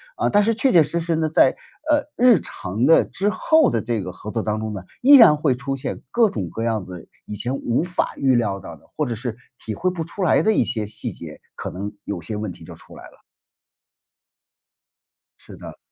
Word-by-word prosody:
啊？ - - -5
呃， - - +3
但 205 - +4
是 230 +1 +1
确 255 +4 +2
确 170 - +6
实 150 +3 -1
实 165 0 -1
呢， 160 -1 0
在， 135 -4 +4 0.4
呃， 295 -1 +2
日 240 -7 +5
常 105 +4 -4
的 165 - +6
之 200 +2 -2
后 315 +8 +3
的 115 - -1
这 115 -2 -2
个 90 - -6
合 105 - -8
作 115 - -2
当 110 0 -2
中 110 0 -4
呢， 95 - -6 0.2
依 280 +3 +8
然 225 -11 +8
会 145 -4 +1
出 135 +1 -4
现 135 - -5
各 230 -2 +3
种 95 - -4
各 110 +7 -5
样 115 -3 0
子 90 -2 -11 0.2
以 105 - -7
前 120 +5 -3
无 125 +2 -1
法 180 0 -2
预 135 -2 +2
料 100 -5 0
到 85 - -9
的 - - -26
或 150 - 0
者 120 - -3
是 120 0 -5 0.3
体 110 - -5
会 185 +2 0
不 170 -3 -4
出 190 +3 -5
来 175 - +3
的 220 - +2
一 - - +3
些 110 -4 -3
细 105 - -4
节， - - -11 0.2
可 - - -6
能 100 +3 -6
有 95 -4 -4
些 105 +6 -5
问 105 -2 -4
题 - - -13
就 - - -11
出 - - -16
来 - - -12
了。 - - -17 2.2
是 - - -14
的。 - - -11
130 Hz, 255 characters per minute, -21 LUFS, 105-180 Hz, 2.2 s, 依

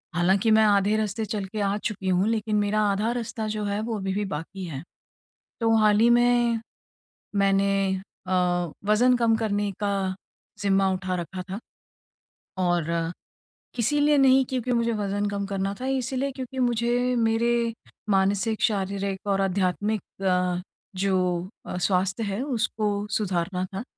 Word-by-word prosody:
हालाँकि 190 +5 +3
मैं 220 0 +6
आधे 205 0 +3
रास्ते 215 +1 -1
चल 210 -1 -3
के 215 +3 -6
आ 200 +1 +1
चुकी 205 -3 -4
हूँ 185 +3 +2
लेकिन 220 -1 0
मेरा 210 +1 +2
आधा 210 +4 0
रास्ता 230 -2 -3
जो 215 0 -3
है 200 +1 -1
वो 225 -1 -3
अभी 190 -1 -2
भी 205 +1 -1
बाकी 185 +3 -5
है। 140 -6 -6 0.8
तो 225 0 +3
हाल 210 -1 +4
ही 230 +2 +5
में 240 -1 +3 0.8
मैंने 195 -1 +2 0.3
अ, 185 - -1 0.5
वज़न 245 +4 +4
कम 230 -2 +3
करने 205 -2 -1
का 205 -1 0 0.7
ज़िम्मा 195 -1 +3
उठा 185 0 -2
रखा 185 +2 -7
था 195 - -3 1.1
और 175 -2 +1 0.9
इसीलिए 295 +5 +3
नहीं 265 -1 +5
क्योंकि 255 -1 -2
मुझे 235 -1 +1
वज़न 205 -1 -1
कम 200 0 -2
करना 195 0 -2
था, - - -3
इसीलिए 265 +1 -1
क्योंकि 260 0 -6
मुझे 245 +1 +1
मेरे 230 0 +1 0.4
मानसिक 200 +3 +1
शारीरिक 200 -1 -1
और 195 -1 +2
आध्यात्मिक 195 +2 0 0.2
अ, 180 -1 +1 0.4
जो 185 -2 0 0.2
अ, - - -4
स्वास्थ्य 185 +3 +1
है 200 +3 -2
उसको 215 -6 -1
सुधारना 185 -3 -1
था, 195 +4 -4
205 Hz, 150 wpm, -25 LUFS, 195-230 Hz, 1.1 s, मैं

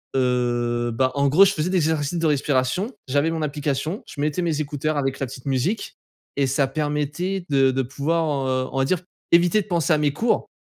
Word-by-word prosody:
heu, 120 -2 0
bah, 130 +3 +1
en 140 0 +2
gros, 155 +8 +6
je 200 0 +4
faisais 160 -1 -1
des 190 - +2
exercices 160 -1 0
de 165 - +1
respiration, 145 - 0 0.2
j'avais 145 +4 +2
mon 165 -1 -3
application, 150 +4 -2
je 145 - -7
mettais 150 +3 0
mes 160 -3 0
écouteurs 150 +1 -2
avec 135 -2 -1
la 135 - -1
petite 130 0 -10
musique 140 - -1 0.4
et 140 - +3
ça 135 +1 +1
permettait 150 +6 -2
de 135 -2 +4
de 135 +1 0
pouvoir, 145 +2 -1
heu, 130 0 -1
on - - -5
va 135 - +2
dire, 180 +5 +1 0.3
éviter 175 +4 +5
de 200 - -11
penser 170 -2 0
à - - +3
mes 150 -2 +1
cours 230 +9 0
145 Hz, 210 wpm, -23 LUFS, 135-165 Hz, 0.4 s, gros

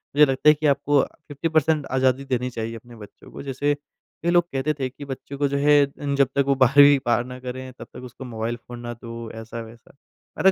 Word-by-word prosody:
मुझे 150 +1 +8
लगता 135 +2 +3
है - - +8
कि 155 - -4
आपको 145 0 +3 0.3
50 145 +3 -3
पर्सेंट 155 -2 +2
आज़ादी 130 +1 +1
देनी 125 -1 -1
चाहिए 115 -1 -5
अपने 120 +1 -12
बच्चों 105 -3 -14
को - - -8
जैसे 145 +2 0 0.5
कई 170 - +1
लोग 175 -1 +5
कहते 140 +3 0
थे 130 -1 -1
कि 140 +2 -11
बच्चों 135 +1 -7
को 145 0 +1
जो 140 +1 -1
है 145 0 +5 0.2
इन 140 -1 -1
जब 140 -1 +4
तक 140 - +4
वो 140 - +3
12वीं 140 +2 +7
पार 120 0 +2
ना 125 0 -9
करे 130 0 -7
तब - - -9
तक 125 - -10
उसको 125 +1 -10
मोबाइल 115 -1 -3
फ़ोन 120 0 -11
ना 120 0 -6
दो 115 -1 -8
ऐसा-वैसा। 115 +2 -10 0.4
मैं 190 - +5
130 Hz, 230 wpm, -23 LUFS, 120-145 Hz, 0.5 s, मुझे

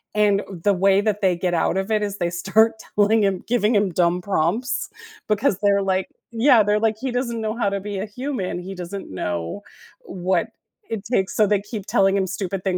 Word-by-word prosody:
and 205 -1 +3 0.2
the 205 - +4
way 195 +1 +3
that 210 0 -1
they 185 -3 +2
get 180 0 -1
out 170 +2 +1
of 195 +2 -2
it 215 -1 +2
is 200 -1 -3
they 175 -2 -1
start 195 +6 +2 0.2
telling 210 +1 +4
him 195 -2 0
giving 230 -1 +2
him 200 -2 +2
dumb 175 +1 +2
prompts, 200 +7 -1 0.4
because 210 -1 +2
they're 200 -1 +4
like 190 -1 0 0.2
Yeah, 235 0 +5
they're 210 +1 +2
like, 220 -1 +1
he 260 +1 -3
doesn't 240 -2 -2
know 215 0 -2
how 230 -4 0
to 200 0 -2
be 200 0 -5
a 195 - -2
human. 220 -5 -4
He 190 +2 -7
doesn't 180 +2 -7
know 90 - -4 0.4
what 190 - -1 0.4
it 220 -3 -4
takes. 190 -6 0
So, 215 - +4
they 205 0 +2
keep 205 -1 -7
telling 195 0 +3
him 190 -1 0
stupid 195 0 -4
things, 190 -2 0
200 Hz, 210 wpm, -22 LUFS, 185-215 Hz, 0.4 s, Yeah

